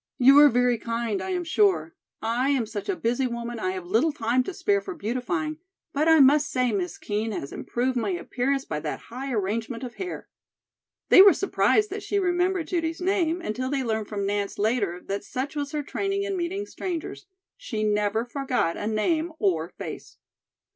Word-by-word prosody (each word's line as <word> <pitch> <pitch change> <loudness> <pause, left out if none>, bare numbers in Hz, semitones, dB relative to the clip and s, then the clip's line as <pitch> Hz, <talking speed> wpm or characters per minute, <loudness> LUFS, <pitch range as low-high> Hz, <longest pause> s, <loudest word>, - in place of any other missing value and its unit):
"You 270 +2 +7
are 295 0 +9
very 245 -1 +2
kind, 230 -3 -2
I - - -4
am 360 -1 -1
sure. 390 +4 +2 0.3
I 240 +4 +1
am 265 -5 +2
such 215 - -6
a 390 - +1
busy 245 -1 0
woman 235 -1 -5
I 185 - -1
have 185 -2 -6
little 225 - +2
time 250 -2 +1
to - - -3
spare 400 +2 +1
for 380 -3 -7
beautifying; 305 +5 -2 0.3
but 300 +3 +1
I 320 -1 +6
must 290 +2 +5
say 255 -2 +1
Miss 190 -4 -2
Kean 215 +2 -2
has 140 -9 -5
improved 255 +2 -2
my 220 -4 0
appearance 255 +9 -1
by 150 - -3
that - - -4
high 270 +2 -4
arrangement 225 +3 -2
of 245 -2 -6
hair." 370 -2 -5 0.8
They - - +9
were 395 0 +9
surprised 420 +1 +2
that 410 +1 -4
she 405 - -2
remembered 360 -2 +1
Judy's 330 -2 -1
name 360 -2 +1
until 255 -2 -3
they 275 -1 -1
learned 220 -3 -2
from 200 -2 -3
Nance 200 0 -2
later 205 -4 0
that 200 +1 -3
such 265 +7 -4
was 285 -1 -3
her 300 -1 -2
training 395 +6 -2
in 400 -1 -2
meeting 375 +3 -2
strangers, 355 -1 -5 0.3
she 240 - -4
never 210 +1 +1
forgot 250 - -1
a 205 - -3
name 310 +10 0
or 170 - 0
face. - - -8
255 Hz, 190 wpm, -26 LUFS, 220-330 Hz, 0.8 s, are